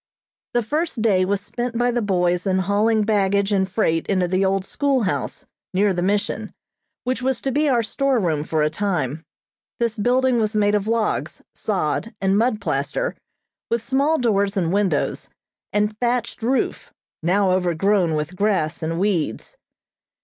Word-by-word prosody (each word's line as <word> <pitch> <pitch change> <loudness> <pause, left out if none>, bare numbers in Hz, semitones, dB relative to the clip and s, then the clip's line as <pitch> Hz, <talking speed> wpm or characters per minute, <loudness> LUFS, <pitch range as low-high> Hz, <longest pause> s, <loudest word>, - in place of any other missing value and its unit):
The 240 - +3
first 300 0 -2
day 190 -5 +3
was 200 +1 0
spent 235 +3 -4
by 245 +1 +2
the 240 0 0
boys 180 -2 +1
in 190 -1 +2
hauling 210 +4 +2
baggage 200 -1 +1
and 190 -1 +1
freight 165 -5 0
into 185 -3 +1
the 185 +2 +1
old 190 0 +1
school 275 -1 +1
house, 185 - -3 0.3
near 200 +1 +3
the 175 - -2
mission, 205 +3 -1 0.5
which 255 +1 -1
was 260 -1 0
to 270 - -1
be 295 +3 +2
our 240 -3 +2
store 270 +3 +1
room 160 -7 0
for 155 0 0
a 150 - +2
time. 160 -6 -2 0.6
This 230 -2 -1
building 250 +2 +2
was 215 0 0
made 205 -1 +3
of 205 0 0
logs, 225 -1 -1
sod 205 +2 -2
and 195 0 +2
mud 220 0 +2
plaster, - - -2 0.5
with 230 -1 0
small 280 +6 +2
doors 200 -5 +1
and 175 -2 +1
windows, 195 -7 0 0.4
and 210 +1 +1
thatched 240 -1 -1
roof, 250 +4 -1 0.3
now 185 +3 +2
overgrown 180 -1 +2
with 150 +4 -3
grass 185 -6 0
and 165 +1 -2
weeds. 175 - -1
205 Hz, 165 wpm, -22 LUFS, 185-235 Hz, 0.6 s, The